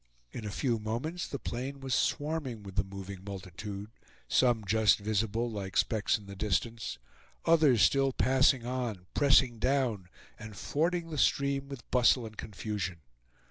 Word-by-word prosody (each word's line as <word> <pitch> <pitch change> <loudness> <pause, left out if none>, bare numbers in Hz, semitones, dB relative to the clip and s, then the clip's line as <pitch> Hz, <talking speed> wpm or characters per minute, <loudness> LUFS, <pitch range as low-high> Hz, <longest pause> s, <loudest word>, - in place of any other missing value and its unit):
In 110 - -6
a - - -3
few 115 +3 0
moments 125 +11 -3
the 140 - -4
plain 135 +2 -5
was 135 -1 -3
swarming 145 -6 -1
with 100 -1 -9
the - - +2
moving 95 -1 -8
multitude, 100 +2 -7 0.4
some 120 -4 +3
just 110 +2 +4
visible, 110 +2 0
like 95 -3 -4
specks 110 -1 +2
in 105 - -14
the 100 0 -9
distance, 110 - -2 0.5
others 150 - +5
still 135 +6 +4
passing 130 -1 +3
on, 120 -7 -3
pressing 135 -4 +4
down, 125 -8 0 0.3
and 105 -2 -9
fording 165 - -1
the 150 - -2
stream 140 0 +1
with 135 -3 -9
bustle 125 -1 +4
and 110 -1 -9
confusion. 100 -5 -4
115 Hz, 150 wpm, -31 LUFS, 100-135 Hz, 0.5 s, others